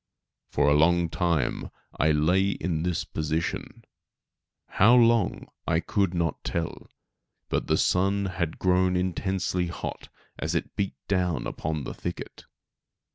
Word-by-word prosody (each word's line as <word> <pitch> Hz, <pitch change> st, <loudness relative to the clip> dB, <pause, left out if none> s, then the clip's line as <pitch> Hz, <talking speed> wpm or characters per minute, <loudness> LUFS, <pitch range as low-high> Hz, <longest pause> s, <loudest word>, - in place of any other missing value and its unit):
For -, -, +2 dB
a 75 Hz, -, +5 dB
long 85 Hz, +3 st, +4 dB
time 85 Hz, -5 st, 0 dB, 0.3 s
I 80 Hz, -, +4 dB
lay 90 Hz, +6 st, +3 dB
in 85 Hz, -5 st, -2 dB
this 85 Hz, -1 st, -1 dB
position, 80 Hz, +1 st, -3 dB, 0.8 s
how 115 Hz, +5 st, +5 dB
long 115 Hz, -4 st, +3 dB, 0.2 s
I 80 Hz, -1 st, +3 dB
could 95 Hz, 0 st, 0 dB
not 85 Hz, -3 st, -1 dB
tell; 85 Hz, -1 st, -3 dB, 0.6 s
but -, -, -1 dB
the -, -, +3 dB
sun 100 Hz, +2 st, +2 dB
had 90 Hz, -4 st, -2 dB
grown 90 Hz, 0 st, +2 dB
intensely 90 Hz, 0 st, -1 dB
hot 85 Hz, -, -6 dB, 0.3 s
as -, -, -2 dB
it -, -, -2 dB
beat 100 Hz, -1 st, -2 dB
down 90 Hz, -4 st, 0 dB
upon 80 Hz, -2 st, -3 dB
the -, -, -5 dB
thicket. -, -, -7 dB
90 Hz, 130 wpm, -27 LUFS, 80-95 Hz, 0.8 s, a